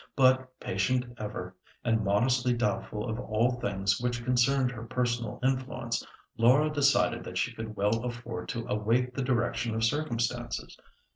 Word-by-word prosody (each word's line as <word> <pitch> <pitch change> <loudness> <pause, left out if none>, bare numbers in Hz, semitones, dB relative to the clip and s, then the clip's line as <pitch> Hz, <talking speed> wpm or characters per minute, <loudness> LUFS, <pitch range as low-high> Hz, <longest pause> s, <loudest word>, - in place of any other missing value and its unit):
But, 130 -1 +3
patient 125 +7 0
ever, 95 -4 -5 0.3
and 115 -2 +2
modestly 125 +5 +2
doubtful 115 -2 -1
of 110 0 -3
all 115 +1 +1
things 95 -1 0
which 120 -1 -2
concerned 125 +1 +3
her 115 -2 -7
personal 120 -2 -1
influence, 130 -3 -1 0.4
Laura 135 +7 +5
decided 145 -2 +3
that - - -5
she - - 0
could 110 -1 -6
well 105 +3 +1
afford 120 -1 -5
to 115 -3 -3
await 115 +4 +1
the 135 - -2
direction 120 -2 0
of 110 - -1
circumstances. 120 -2 -1
120 Hz, 145 wpm, -29 LUFS, 110-125 Hz, 0.4 s, Laura